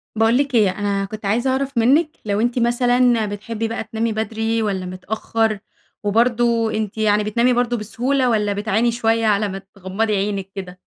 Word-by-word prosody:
باقول 225 +2 +3
لِك 275 -2 0
إيه، 210 -4 +5
أنا 200 +1 -1
كنت 215 +1 -8
عايزة 235 +6 +1
أعرف 270 0 -2
منِك، 280 +8 +4 0.2
لو 205 0 0
أنتِ 240 +1 0
مثلًا 245 -1 +3
بتحبّي 215 +2 -4
بقى 230 0 -4
تنامي 225 +1 -2
بدري 225 +1 -1
والّا 195 -4 -2
متأخر؟ 215 +4 -2 0.4
وبرضو 230 +1 +2
أنتِ 215 -1 -3
يعني 210 -1 +2
بتنامي 235 +4 +2
برضو 245 0 +1
بسهولة، 245 +5 0
والّا 210 -3 +1
بتعاني 220 +3 +1
شوية 225 -1 +1
على 210 -1 +2
ما 195 0 -6
تغمضي 200 +3 -1
عينِك 195 -1 -2
كده؟ 185 -2 -7
220 Hz, 170 wpm, -20 LUFS, 205-235 Hz, 0.4 s, إيه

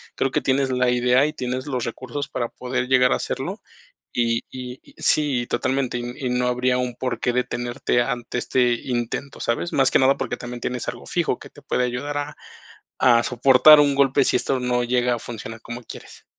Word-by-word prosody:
Creo 135 - 0
que - - 0
tienes 135 0 +1
la 125 -1 +2
idea 125 +2 +3
y 150 - -4
tienes 130 +2 -4
los 125 -4 -2
recursos 130 +4 -5
para 120 -1 -3
poder 125 0 -3
llegar 125 -1 +4
a - - +2
hacerlo - - -4 0.5
y 115 -1 +1
y 125 0 -8
y - - -20
sí, 135 -5 +1
totalmente, 130 -2 -1
y 120 0 -5
y 125 - 0
no 125 0 +1
habría 125 0 +1
un 125 -1 -3
porqué 125 -1 -1
detenerte 120 0 0
ante 120 0 -3
este 125 0 +2
intento, 125 +2 -3
¿sabes? 120 +9 -1
Más 135 -1 +3
que - - +5
nada 135 +1 +4
porque - - -3
también 120 0 -7
tienes 125 0 -4
algo - - -6
fijo - - -1
que - - -12
te - - -16
puede 125 - 0
ayudar 125 +4 -3
a 145 +1 -4 0.7
a 120 -2 +5
soportar 135 +4 +6
un 140 -1 +2
golpe 140 0 +3
si - - +1
esto 135 -1 -1
no 125 0 0
llega 125 0 +1
a 115 - -7
funcionar 115 -1 -8
como 120 +1 -8
quieres. - - -12
125 Hz, 200 wpm, -23 LUFS, 120-130 Hz, 0.7 s, soportar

